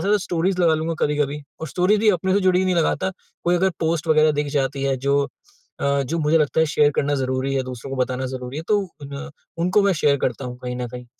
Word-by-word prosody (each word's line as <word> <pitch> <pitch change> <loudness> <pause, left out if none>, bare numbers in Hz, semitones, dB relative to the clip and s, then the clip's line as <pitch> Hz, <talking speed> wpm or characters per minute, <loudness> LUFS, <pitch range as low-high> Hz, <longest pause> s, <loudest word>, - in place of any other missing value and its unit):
ज़्यादा 205 +2 +3
स्टोरीज़ 180 0 -1
लगा 165 -2 +4
लूँगा 160 +1 -2
कभी-कभी 145 0 0 0.2
और 160 - -4
स्टोरीज़ 185 +9 +2
भी 220 - +3
अपने 185 0 0
से 200 - +3
जुड़ी 185 -1 +3
नहीं 185 - +1
लगाता। 170 +2 +1 0.3
कोई 175 - +3
अगर 190 +2 +2
पोस्ट 165 0 0
वगैरह 155 0 +5
दिख 150 0 -1
जाती 135 -1 -1
है, 135 -1 +1
जो 140 +2 +1 0.6
अ, 140 0 +1
जो 160 +6 -2
मुझे 155 +1 +3
लगता 150 +1 +1
है 160 - +4
शेयर 150 -1 +3
करना 145 0 +1
ज़रूरी 130 0 -1
है, 135 - +1
दूसरों 130 0 -7
को 135 - -4
बताना 130 +1 -2
ज़रूरी 130 +1 -6
है, 155 - -3
तो 210 - +4 0.2
उन 140 +3 -7 0.3
उनको 180 +5 +3
मैं 200 -1 +3
शेयर 145 -4 +2
करता 130 +1 -2
हूँ 125 -1 -6
कहीं 125 0 -5
ना 125 0 -3
कहीं, 125 +1 -9
150 Hz, 240 wpm, -22 LUFS, 135-175 Hz, 0.6 s, वगैरह